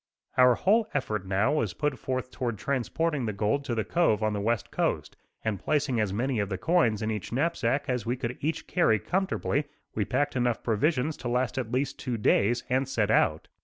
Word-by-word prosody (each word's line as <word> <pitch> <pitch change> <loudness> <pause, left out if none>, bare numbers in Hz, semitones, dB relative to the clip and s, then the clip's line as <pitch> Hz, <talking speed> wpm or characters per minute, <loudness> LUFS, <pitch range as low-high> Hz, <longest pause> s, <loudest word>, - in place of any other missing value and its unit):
Our 125 -1 +6
whole 220 - +3
effort, 105 -3 -1
now, 100 +9 +2
was 110 - 0
put 145 +2 -1
forth 130 -1 -3
toward 120 -4 -3
transporting 140 +4 -1
the 105 - -2
gold 110 +8 0
to 120 -4 -2
the 110 - 0
cove 135 -11 +2
on 110 0 +1
the 100 - -2
west 115 +1 -1
coast; - - -1 0.3
and 105 -3 -1
placing 140 -5 0
as 105 -3 +1
many 120 +4 -1
of 100 -1 -1
the 95 - -2
coins 115 - +2
in 110 - 0
each 105 -4 -4
knapsack 140 -1 0
as 125 -4 -1
we 120 +3 -1
could 125 -1 -3
each 160 +3 -2
carry 140 -12 +3
comfortably, 180 - -1 0.3
we 110 - 0
packed 145 +8 0
enough 120 -2 0
provisions 140 +6 +1
to 125 - -6
last 125 +1 0
at 120 -3 -4
least 135 +2 -1
two 125 -3 -2
days, 110 +2 +2
and 130 +1 0
set 110 -5 +1
out. - - +2
125 Hz, 205 wpm, -28 LUFS, 110-140 Hz, 0.3 s, Our